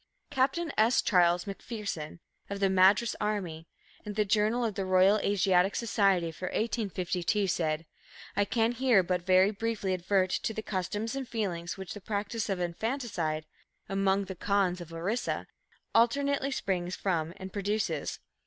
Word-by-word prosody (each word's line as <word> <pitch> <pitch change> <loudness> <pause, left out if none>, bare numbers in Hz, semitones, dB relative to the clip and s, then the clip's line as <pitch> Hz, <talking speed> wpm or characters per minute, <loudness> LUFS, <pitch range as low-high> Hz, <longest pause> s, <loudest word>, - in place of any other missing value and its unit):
Captain 285 +4 +1
S. 225 +3 +4
Charles 175 -2 +3
MacPherson, 200 -6 -5 0.3
of 200 0 -4
the 195 -1 +2
Madras 195 +5 +4
Army, 180 -7 -2 0.4
in 210 - -5
the 210 0 +1
Journal 215 +4 +2
of 220 - -1
the 195 - -2
Royal 185 +2 +4
Asiatic 190 -1 +2
Society 195 -7 +2
for 170 +3 -7
1852, 200 -3 -1
said: 165 -3 -1 0.5
"I 205 - +3
can 225 +1 +1
here 245 -5 +3
but 180 0 -1
very 185 +2 +4
briefly 215 -3 -2
advert 185 +1 +1
to 220 - -1
the 220 - -4
customs 210 +5 -3
and 270 -2 -4
feelings 180 -7 -3
which 190 -2 -6
the 205 - -9
practice 210 +2 -3
of 195 -2 -1
infanticide 175 - -2 0.4
(among 195 0 +1
the 190 - -6
Khonds 190 -1 +1
of 170 -1 -9
Orissa) 185 +9 -2 0.5
alternately 275 +4 +2
springs 185 -8 -2
from 165 -4 -1
and 190 -1 -8
produces. 205 +1 -1
195 Hz, 150 wpm, -30 LUFS, 180-220 Hz, 0.5 s, S